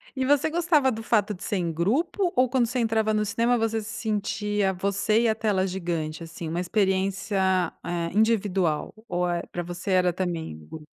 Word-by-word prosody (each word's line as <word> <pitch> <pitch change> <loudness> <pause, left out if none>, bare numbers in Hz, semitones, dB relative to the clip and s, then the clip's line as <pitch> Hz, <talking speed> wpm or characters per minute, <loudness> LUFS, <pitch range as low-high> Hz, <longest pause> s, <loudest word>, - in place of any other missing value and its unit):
E 265 - -1
você 290 +3 +3
gostava 320 -5 +3
do 225 -2 -5
fato 215 -2 +1
de 185 - -10
ser - - -2
em 170 -3 -1
grupo 315 - 0
ou, 255 +1 +4
quando 250 -1 +1
você 245 +3 -3
entrava 220 -2 +1
no 210 0 +1
cinema, 230 +4 +1
você 225 -1 0
se 210 - -8
sentia 210 -2 -1
você 200 +4 +1
e 235 - +3
a - - +3
tela 210 -4 0
gigante? 170 -4 -3
Assim, 165 0 -7
uma 170 +2 -2
experiência, 190 0 +1
eh, 170 -1 -2
individual 195 -7 +1
ou, 180 -2 0
eh, 175 -1 -1
pra 175 - -3
você 175 +3 -5
era 180 -1 +3
também 175 - -3
o 80 0 -14
grupo? 155 - -10
200 Hz, 195 wpm, -26 LUFS, 175-225 Hz, -, ou